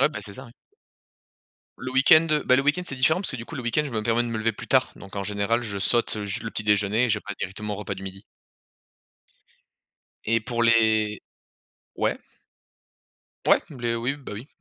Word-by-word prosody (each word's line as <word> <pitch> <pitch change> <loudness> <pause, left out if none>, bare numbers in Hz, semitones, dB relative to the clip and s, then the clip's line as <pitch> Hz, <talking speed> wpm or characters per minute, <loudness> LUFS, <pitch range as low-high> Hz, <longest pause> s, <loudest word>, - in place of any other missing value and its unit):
Ouais, - - +6
bah, 155 - -7
c'est 100 - -9
ça 130 - -9
oui. 115 - -16 1.3
Le 130 +1 -6
week-end, 155 +5 +6 0.2
bah, 125 - +5
le 130 - +3
week-end 150 +6 +1
c'est 135 - -4
différent 160 +8 +2
parce 190 - -1
que - - -4
du 115 -1 -7
coup - - -9
le 130 - -5
week-end 120 +5 +1
je 145 - -5
me 110 -3 -3
permets 115 +1 +2
de 120 - -3
me 115 -1 -3
lever 115 +1 +1
plus - - -10
tard. - - +3
Donc 100 +1 -12
en 100 - -2
général 105 +4 0
je 100 -3 -4
saute, 115 +1 +1
heu, 105 - -4
ju 100 - -3
le 115 - -5
petit 110 - -2
déjeuner 105 +3 +3
et 125 - -2
je 105 - +2
passe 100 -1 -7
directement 105 +2 -4
au - - -6
repas 105 - -4
du 95 - -9
midi. 95 0 -8 2.0
Et 115 +1 +3
pour 120 +1 -2
les 110 -2 +3 0.7
ouais? - - 0 1.3
Ouais. - - +5
Blé, 120 -5 -3
oui, 125 +4 -1
bah, 140 -6 -10
oui. 110 +7 -8
115 Hz, 220 wpm, -25 LUFS, 105-130 Hz, 2.0 s, Ouais